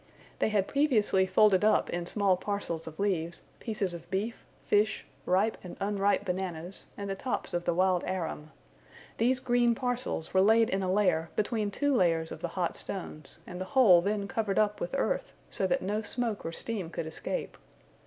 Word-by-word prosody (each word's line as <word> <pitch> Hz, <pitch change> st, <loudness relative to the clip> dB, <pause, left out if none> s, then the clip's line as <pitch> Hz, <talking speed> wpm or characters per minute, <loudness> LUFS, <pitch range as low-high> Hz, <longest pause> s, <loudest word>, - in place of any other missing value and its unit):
They -, -, +2 dB
had 205 Hz, -3 st, +1 dB
previously 220 Hz, -10 st, +3 dB
folded 190 Hz, +1 st, +4 dB
up 215 Hz, -, +4 dB
in 175 Hz, 0 st, -2 dB
small 200 Hz, -2 st, +2 dB
parcels 180 Hz, -4 st, -3 dB
of 160 Hz, -1 st, -9 dB
leaves, 175 Hz, -4 st, -1 dB, 0.2 s
pieces 210 Hz, -6 st, -2 dB
of 170 Hz, 0 st, -9 dB
beef, 205 Hz, +5 st, -3 dB, 0.2 s
fish, 210 Hz, +1 st, +2 dB, 0.2 s
ripe 200 Hz, +5 st, +2 dB
and 180 Hz, -, -9 dB
unripe 200 Hz, 0 st, +1 dB
bananas, 180 Hz, -1 st, -4 dB
and 200 Hz, -, -4 dB
the 195 Hz, -, -1 dB
tops 250 Hz, +6 st, -3 dB
of 175 Hz, 0 st, -1 dB
the 175 Hz, -, +2 dB
wild 185 Hz, 0 st, +2 dB
arum. 165 Hz, -4 st, -4 dB, 0.7 s
These 250 Hz, +3 st, +2 dB
green 240 Hz, -2 st, +2 dB
parcels 245 Hz, -9 st, -2 dB
were 190 Hz, -, +5 dB
laid 220 Hz, +3 st, +4 dB
in 195 Hz, -, 0 dB
a 185 Hz, -1 st, 0 dB
layer 180 Hz, -5 st, +2 dB
between 215 Hz, 0 st, 0 dB
two 285 Hz, +7 st, +1 dB
layers 165 Hz, -5 st, +2 dB
of -, -, -7 dB
the -, -, -1 dB
hot 175 Hz, -2 st, 0 dB
stones, 155 Hz, -6 st, -3 dB
and 180 Hz, 0 st, -7 dB
the -, -, -2 dB
whole 190 Hz, -10 st, +8 dB
then 200 Hz, +1 st, -1 dB
covered 215 Hz, -4 st, -1 dB
up 210 Hz, -1 st, +2 dB
with 175 Hz, -, -3 dB
earth, -, -, -1 dB, 0.2 s
so 190 Hz, -, 0 dB
that 180 Hz, -, 0 dB
no 205 Hz, +3 st, -1 dB
smoke 225 Hz, -1 st, -2 dB
or -, -, -3 dB
steam 195 Hz, -1 st, -2 dB
could 165 Hz, -, -4 dB
escape. 160 Hz, -, -4 dB
195 Hz, 185 wpm, -29 LUFS, 180-220 Hz, 0.7 s, whole